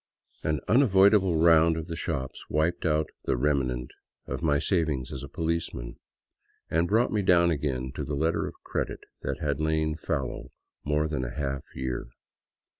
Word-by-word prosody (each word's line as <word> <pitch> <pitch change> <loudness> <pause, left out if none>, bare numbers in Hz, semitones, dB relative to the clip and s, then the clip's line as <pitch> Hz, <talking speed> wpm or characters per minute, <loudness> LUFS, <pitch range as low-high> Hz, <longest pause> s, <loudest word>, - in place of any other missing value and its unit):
An 75 -3 0
unavoidable 100 - +5
round 80 0 +5
of 80 - -4
the 85 -1 -5
shops 70 -5 -4
wiped 80 +3 +1
out 75 0 +1
the - - +1
remnant 65 -3 0 0.3
of - - -4
my 75 -3 +3
savings 75 -6 0
as 65 - -5
a 70 - -8
policeman, 80 -7 -3 0.7
and 85 +2 +2
brought 110 +5 +2
me 105 - +2
down 85 -2 +4
again 65 -4 -2
to - - -4
the 75 - -3
letter 80 +4 0
of - - -8
credit - - -3 0.2
that - - -2
had 70 -1 -1
lain 80 0 +1
fallow 75 -4 -3 0.3
more 75 +1 +1
than 75 -4 -2
a - - -5
half 70 -2 -2
year. 65 -1 -3
80 Hz, 165 wpm, -27 LUFS, 70-85 Hz, 0.7 s, unavoidable